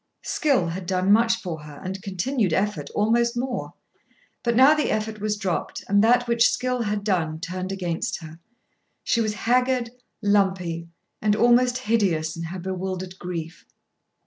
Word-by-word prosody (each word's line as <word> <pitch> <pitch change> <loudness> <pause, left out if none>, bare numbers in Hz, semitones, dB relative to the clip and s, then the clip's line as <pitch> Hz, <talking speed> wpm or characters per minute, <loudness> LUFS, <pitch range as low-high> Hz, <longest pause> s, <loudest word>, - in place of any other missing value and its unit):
Skill 285 - +1
had 175 +1 -5
done 185 +1 +1
much 225 +2 +5
for 170 -8 -6
her 150 -1 -11
and 190 +1 -5
continued 195 +1 -1
effort 165 -6 -1
almost 235 +3 +2
more. 250 0 -3 0.7
But 235 -1 0
now 265 +5 +7
the 305 -1 0
effort 215 0 -2
was 210 0 -1
dropped 190 -4 -3
and 200 +1 +4
that 245 +2 +4
which 235 0 +4
skill 250 +1 -1
had 210 -2 -1
done 165 -6 0
turned 185 +1 -4
against 175 -4 -2
her. 160 0 -11 0.6
She 230 - +1
was 215 -1 -1
haggard, 250 +1 +1 0.3
lumpy, 190 -5 +1 0.3
and 210 -1 +2
almost 245 +2 +4
hideous 195 -10 0
in 165 0 -5
her 175 +3 -6
bewildered 185 0 -4
grief. 170 -2 -6
205 Hz, 155 wpm, -24 LUFS, 180-235 Hz, 0.7 s, now